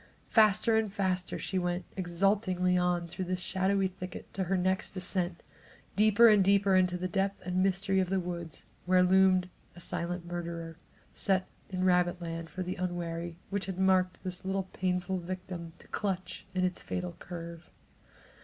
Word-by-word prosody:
Faster 220 +1 +5
and 220 -2 0
faster 185 -2 -1
she 190 - -2
went 175 0 -1
exultingly 185 0 +1
on 180 -1 +1
through 175 +2 -4
this 185 0 -2
shadowy 190 +1 +1
thicket 185 -1 -8
to 195 - -1
the 190 +1 0
next 185 +2 0
descent, 180 -2 -2 0.4
and - - -33
deeper 215 +3 +6
and 210 -3 +6
deeper 200 0 +4
into 180 -1 +3
the 180 +1 -2
depth 195 +2 -1
and 180 0 0
mystery 195 0 +2
of 185 -2 +1
the 190 0 +1
woods, 170 -3 -6 0.2
where 185 0 +5
loomed 185 0 +4 0.3
a - - -11
silent 170 0 -3
murderer, 170 -1 -5 0.4
set 190 -1 +1 0.2
in 185 -1 -2
rabbit 180 -1 +3
land 165 -1 -5
for 185 - -4
the 180 +1 -4
unwary, 170 -2 -3
which 195 -2 -2
had 190 -2 -4
marked 185 -1 +2
this 180 -1 -4
little 190 0 -1
pitiful 185 0 -1
victim 175 -1 -6
to - - -16
clutch 185 -2 -3
in 185 - +1
its 180 -1 -1
fatal 180 -2 -4
curve. 170 -1 -8
185 Hz, 170 wpm, -31 LUFS, 175-190 Hz, 0.4 s, deeper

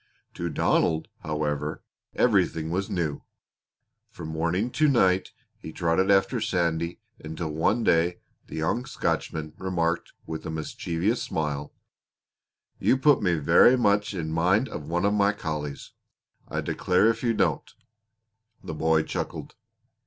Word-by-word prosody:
To 85 0 -3
Donald, 80 +1 +1
however, 75 -1 -3 0.3
everything 80 0 +2
was 95 +3 -1
new. 80 -5 -2 0.9
From 80 -2 -8
morning 85 +9 -1
to 155 +3 +3
night 95 -9 +3 0.3
he 80 - -8
trotted 85 +3 +1
after 100 +5 +3
Sandy 85 -3 -1 0.2
until 80 +1 -5
one 90 +10 +1
day 85 -2 +2 0.3
the - - -8
young 80 +11 -1
Scotchman 80 - -2
remarked 85 -3 -1
with 80 -1 -6
a - - -5
mischievous 85 +6 -2
smile: 75 -2 -3 1.1
"You 130 - +3
put 145 0 +4
me 90 -4 +2
verra 100 - +5
much 105 -3 +2
in 80 -3 -3
mind 90 +9 +2
of 75 -1 -7
one 85 +3 0
of 100 - +2
my 100 0 +3
collies 75 -7 -5 0.6
I - - -3
declare 90 +4 +2
if 115 0 +1
you 115 -2 +1
don't!" 80 -8 0 0.9
The - - -5
boy 80 0 +2
chuckled. - - -5
85 Hz, 135 wpm, -26 LUFS, 80-100 Hz, 1.1 s, verra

